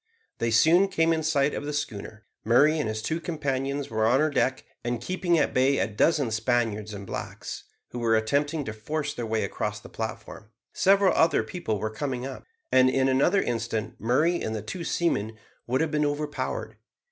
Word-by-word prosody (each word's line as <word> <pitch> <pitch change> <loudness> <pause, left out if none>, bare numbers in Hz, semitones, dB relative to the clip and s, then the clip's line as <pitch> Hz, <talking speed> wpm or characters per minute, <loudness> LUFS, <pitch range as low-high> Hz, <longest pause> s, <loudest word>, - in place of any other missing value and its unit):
They 115 - +1
soon 165 - +5
came 165 -3 +2
in 160 - 0
sight 150 -2 +1
of - - -4
the - - -2
schooner. 110 -6 -5 0.2
Murray 145 +8 +4
and 115 - -1
his 110 0 -4
two 165 +1 -2
companions 140 -4 -2
were 110 0 +2
on 125 +4 +4
her 155 0 +2
deck, 130 -1 0 0.2
and 120 0 -2
keeping 175 +5 0
at 150 - +1
bay 135 +2 +3
a - - +2
dozen 125 +4 +1
Spaniards 110 -2 0
and 100 -1 -7
blacks, - - -6 0.2
who 120 - -6
were 115 -1 +2
attempting 145 +7 0
to 110 - -4
force 150 +7 -3
their 120 -2 -4
way 110 0 0
across 105 +1 -3
the - - -13
platform. 110 -1 -6 0.2
Several 195 0 +4
other 165 +1 +3
people 140 - -3
were 110 +2 -3
coming 130 +1 -3
up, 135 - -7 0.3
and 130 0 +6
in 130 0 +2
another 145 +9 +3
instant 115 -2 -2
Murray 155 +10 +2
and 110 - -2
the 105 - -4
two 170 +11 -5
seamen 110 -12 -1 0.3
would 130 +4 +1
have 160 -2 0
been 150 -1 +1
overpowered. 145 0 -3
130 Hz, 195 wpm, -26 LUFS, 110-155 Hz, 0.3 s, and